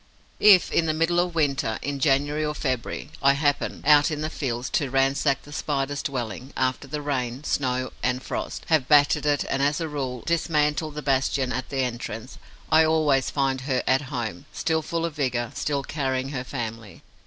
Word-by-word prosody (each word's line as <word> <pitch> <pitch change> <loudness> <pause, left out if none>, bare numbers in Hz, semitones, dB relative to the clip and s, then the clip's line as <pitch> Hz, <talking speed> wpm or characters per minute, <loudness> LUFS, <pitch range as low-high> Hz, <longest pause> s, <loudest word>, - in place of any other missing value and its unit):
If, 200 -4 +6
in 165 - +2
the 155 - +1
middle 165 +2 +2
of 175 -1 0
winter, 140 -8 +1
in 140 0 -3
January 145 +2 +2
or 150 0 -2
February, 130 +1 -3
I 140 0 +5
happen, 145 0 -1
out 150 +1 +6
in 150 -1 -3
the 155 +1 -3
fields, 125 -5 -3
to 140 -4 0
ransack 135 +1 +1
the 145 - -12
Spider's 145 -1 -2
dwelling, 125 -1 -4
after 130 +1 -1
the 150 +2 -4
rain, 130 -2 -2
snow 130 -3 -1
and 125 +1 -1
frost - - -4
have 155 -6 +3
battered 145 0 +4
it 145 -1 +2
and, 135 - -1
as 145 +2 +2
a 165 - -2
rule, 130 -5 -4
dismantled 155 -2 0
the 150 - -5
bastion 135 -1 +1
at 130 - -4
the 135 -1 0
entrance, 120 -1 -5 0.3
I 160 +1 +7
always 155 -4 +2
find 135 -2 0
her 130 -1 -1
at 130 +1 +3
home, 110 -9 -4
still 160 -1 0
full 165 +2 -2
of 165 -3 -4
vigour, 125 -4 -1
still 140 -1 -1
carrying 135 -2 -2
her 135 -3 -4
family. 115 -4 -6
140 Hz, 190 wpm, -25 LUFS, 130-150 Hz, 0.3 s, I